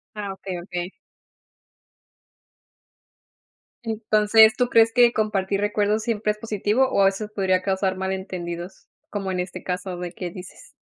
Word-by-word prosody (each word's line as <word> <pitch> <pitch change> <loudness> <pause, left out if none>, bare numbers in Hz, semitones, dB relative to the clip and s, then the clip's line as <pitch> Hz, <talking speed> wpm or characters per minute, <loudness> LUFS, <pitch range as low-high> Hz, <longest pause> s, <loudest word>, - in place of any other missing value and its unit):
Ah, 205 -2 -4
okey, 190 -1 -6
okey. 180 -1 -5 2.9
Entonces, 220 -1 +4
¿tú 250 - +2
crees 225 -1 +5
que 240 -1 +5
compartir 200 -2 0
recuerdos, 210 +1 +1
siempre 215 -2 0
es 210 - -18
positivo, 220 +4 0
o 200 - +2
a - - +6
veces 195 +2 0
podría 185 -2 +1
causar 190 0 0
malentendidos? 185 -1 -5 0.2
Como 195 -2 -3
en 180 - -2
este 180 +1 -5
caso, 180 0 -4
de 175 0 -5
que 180 0 -6
dices. 185 - -12
200 Hz, 140 wpm, -23 LUFS, 185-215 Hz, 2.9 s, a